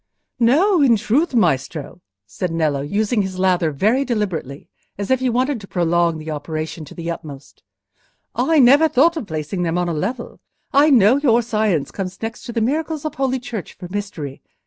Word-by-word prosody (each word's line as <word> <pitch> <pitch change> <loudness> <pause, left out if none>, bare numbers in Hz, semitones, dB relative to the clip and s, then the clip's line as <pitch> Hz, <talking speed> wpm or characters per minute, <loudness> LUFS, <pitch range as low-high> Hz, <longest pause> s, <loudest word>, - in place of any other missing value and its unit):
"No, 315 - +4
in 255 -5 +5
truth, 260 +8 0
Maestro," 155 - 0 0.2
said 180 - -4
Nello, 155 -4 0
using 210 - 0
his 190 -1 -4
lather 185 -3 +2
very 215 - +1
deliberately, 190 - -3 0.3
as 200 +4 -3
if 260 - +3
he 260 -1 0
wanted 255 +1 0
to 195 - -11
prolong 170 -2 +1
the 155 0 -6
operation 155 +1 -5
to - - -13
the 170 0 -4
utmost, 145 -4 -10 0.7
"I 325 -1 +1
never 285 +4 +6
thought 315 +4 +3
of 275 -10 -5
placing 155 +3 -4
them 170 0 0
on 180 0 0
a 170 - -1
level: 230 +11 -4 0.3
I 285 +3 +5
know 240 -2 +5
your 240 -5 +3
science 215 -9 0
comes 190 -1 -5
next 225 +1 -6
to - - -4
the 230 -1 -1
miracles 310 +5 -1
of 310 - -2
Holy 265 -1 0
Church 225 -6 -7
for 180 - -10
mystery. 185 -9 -5
205 Hz, 185 wpm, -20 LUFS, 165-255 Hz, 0.7 s, never